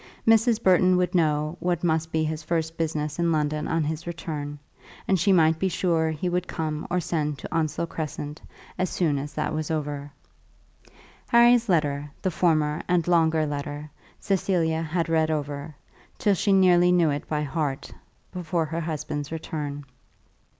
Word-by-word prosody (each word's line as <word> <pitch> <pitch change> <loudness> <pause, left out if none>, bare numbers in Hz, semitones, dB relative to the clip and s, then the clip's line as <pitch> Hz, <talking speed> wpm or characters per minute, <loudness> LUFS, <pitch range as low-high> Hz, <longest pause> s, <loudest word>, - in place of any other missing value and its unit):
Mrs. 225 0 +4
Burton 185 0 +5
would 180 +1 0
know 155 -1 +1
what 175 -1 -1
must 160 -1 0
be 160 0 +1
his 155 0 -2
first 160 0 -2
business 155 -1 -2
in 170 -1 +2
London 150 -1 0
on 165 0 0
his 160 +3 -4
return, 150 -4 -5 0.5
and 190 - +2
she 185 +5 +3
might 160 -3 +4
be 190 - +1
sure 165 -3 +1
he 160 +3 -3
would 180 0 -1
come 155 -1 -3
or 180 +1 +1
send 150 -4 -2
to 125 - -7
Onslow 160 +1 0
Crescent 150 -2 -6 0.4
as 185 - +1
soon 155 -6 0
as 145 +2 -7
that 155 - -1
was 155 0 -3
over. 145 -2 -3 1.2
Harry's 235 -1 +5
letter, 145 -4 +1
the 185 - +1
former 155 -2 +1
and 175 -2 +1
longer 160 -2 +3
letter, 145 +1 -5 0.3
Cecilia 170 -4 0
had 165 +1 -1
read 160 -1 +2
over, 145 0 -3 0.4
till 205 - +2
she 200 +2 +1
nearly 180 -2 +5
knew 170 -4 +4
it 145 - -4
by 150 -1 -1
heart, 145 -2 -3 0.4
before 170 -2 -1
her 165 +2 -3
husband's 150 -2 -4
return. 145 -3 -5
160 Hz, 165 wpm, -25 LUFS, 150-175 Hz, 1.2 s, Burton